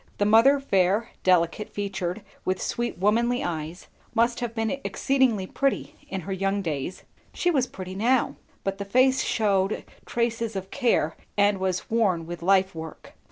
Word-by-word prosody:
The 205 - +2
mother 230 +7 +6
fair, 200 -2 +1
delicate 180 +2 +2
featured, 195 -1 -3 0.2
with 185 0 -1
sweet 240 0 -2
womanly 235 +6 +2
eyes, 165 +1 -4 0.3
must 235 +1 +2
have 240 -1 -4
been 225 -1 0
exceedingly 260 -8 +1
pretty 275 +7 -1
in 190 -1 -3
her 195 +4 -4
young 195 +1 0
days; 155 +1 -4 0.3
she 355 - +2
was 265 -6 +2
pretty 185 -4 -7
now; 235 +6 +2 0.3
but 195 0 -2
the - - -2
face 255 +6 +3
shewed 200 -3 +1 0.2
traces 230 -2 -1
of 190 0 -5
care 235 - +1 0.2
and 200 -1 +3
was 185 +1 -2
worn 195 -8 +2
with 175 +1 -7
life 190 +1 +3
work. 160 -1 -9
200 Hz, 160 wpm, -26 LUFS, 185-235 Hz, 0.3 s, mother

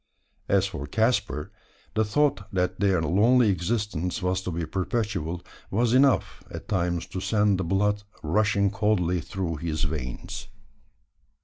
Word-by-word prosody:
As 100 -1 +4
for 85 -8 -5
Caspar, 105 - 0 0.4
the 110 - +2
thought 110 -2 +1
that 90 -1 -1
their 95 -5 +2
lonely 110 +8 +4
existence 95 -1 -1
was 90 +1 +1
to 95 - -4
be 85 0 -2
perpetual, 90 -2 -2 0.3
was 115 +3 +1
enough 135 +1 +3
at - - -8
times 85 -3 0
to 95 - -6
send 105 -2 +2
the - - 0
blood 105 +3 +1 0.2
rushing 100 +4 +2
coldly 100 -4 +1
through 85 -2 -3
his 80 0 -2
veins. 75 -6 -4
95 Hz, 135 wpm, -26 LUFS, 85-105 Hz, 0.4 s, As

